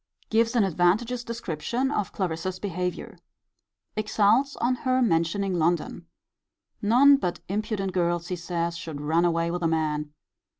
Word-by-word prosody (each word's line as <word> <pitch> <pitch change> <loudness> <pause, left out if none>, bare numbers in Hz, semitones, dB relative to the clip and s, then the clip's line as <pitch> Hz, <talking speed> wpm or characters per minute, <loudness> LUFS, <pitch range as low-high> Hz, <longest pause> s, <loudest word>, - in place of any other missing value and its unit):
Gives 230 +2 +2
an 230 - +4
advantageous 195 +7 +1
description 235 - -3
of 210 -8 -1
Clarissa's 185 0 -3
behaviour. 180 -2 -4 0.8
Exults 215 +5 +2
on 250 +1 0
her 255 +1 +1
mentioning 190 -2 +1
London. 170 0 -1 0.7
None 255 +7 +6
but 180 -9 -3
impudent 200 -1 -2
girls, 175 -1 0
he 180 - -1
says, 170 0 -3
should 160 -3 -6
run 160 +4 +1
away 170 0 +1
with 175 +1 -3
a 165 - +2
man. 150 -2 -1
185 Hz, 135 wpm, -26 LUFS, 170-225 Hz, 0.8 s, None